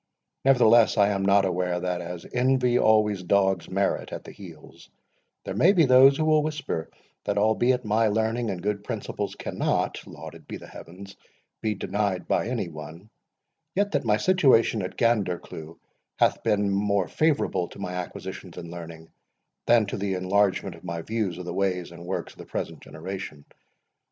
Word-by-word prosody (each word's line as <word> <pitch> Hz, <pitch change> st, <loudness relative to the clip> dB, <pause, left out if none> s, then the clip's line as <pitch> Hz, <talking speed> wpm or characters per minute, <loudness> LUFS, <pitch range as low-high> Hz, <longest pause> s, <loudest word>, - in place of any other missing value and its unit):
Nevertheless, 120 Hz, -4 st, +5 dB
I 100 Hz, -1 st, +5 dB
am 100 Hz, -1 st, -1 dB
not 100 Hz, 0 st, +4 dB
unaware, 90 Hz, -1 st, -1 dB
that, 90 Hz, 0 st, -2 dB
as 85 Hz, 0 st, -7 dB
Envy 125 Hz, -1 st, +2 dB
always 105 Hz, -3 st, +3 dB
dogs 95 Hz, -1 st, +1 dB
Merit 100 Hz, +1 st, -1 dB
at -, -, -6 dB
the -, -, -10 dB
heels, 85 Hz, -6 st, -13 dB, 0.6 s
there -, -, -4 dB
may 185 Hz, +5 st, +5 dB
be 170 Hz, -5 st, +5 dB
those 135 Hz, +2 st, +7 dB
who 155 Hz, -, 0 dB
will 155 Hz, -1 st, +4 dB
whisper, 150 Hz, -, -3 dB, 0.4 s
that -, -, -1 dB
albeit 120 Hz, +4 st, +2 dB
my 110 Hz, +2 st, +2 dB
learning 110 Hz, +2 st, 0 dB
and 90 Hz, -3 st, -4 dB
good 105 Hz, 0 st, -2 dB
principles -, -, -4 dB
cannot -, -, -1 dB
(lauded -, -, -11 dB
be -, -, -6 dB
the -, -, -12 dB
heavens) 95 Hz, +3 st, -11 dB, 0.5 s
be 110 Hz, -1 st, -1 dB
denied 100 Hz, -1 st, -2 dB
by -, -, +1 dB
any 120 Hz, -6 st, -2 dB
one, 80 Hz, +6 st, -10 dB, 0.6 s
yet 205 Hz, +1 st, +1 dB
that 145 Hz, -2 st, 0 dB
my 105 Hz, -3 st, +2 dB
situation 130 Hz, -, +3 dB
at 90 Hz, -, -6 dB
Gandercleugh 90 Hz, -7 st, -1 dB, 0.4 s
hath -, -, +2 dB
been 100 Hz, -1 st, +1 dB
more 100 Hz, -1 st, +1 dB
favourable 150 Hz, -, +1 dB
to -, -, -14 dB
my 90 Hz, -2 st, -5 dB
acquisitions 90 Hz, -1 st, -7 dB
in 85 Hz, -1 st, -7 dB
learning 85 Hz, -1 st, -9 dB, 0.6 s
than 120 Hz, -2 st, +5 dB
to 100 Hz, -, -4 dB
the 100 Hz, -1 st, -2 dB
enlargement 95 Hz, 0 st, +1 dB
of 85 Hz, -, -15 dB
my 85 Hz, 0 st, -5 dB
views 105 Hz, -5 st, -2 dB
of 90 Hz, -, -7 dB
the 85 Hz, -, -4 dB
ways 90 Hz, -2 st, -1 dB
and 85 Hz, 0 st, -11 dB
works -, -, -4 dB
of -, -, -24 dB
the -, -, -10 dB
present -, -, -5 dB
generation. 80 Hz, -3 st, -7 dB
100 Hz, 170 wpm, -26 LUFS, 90-115 Hz, 0.6 s, those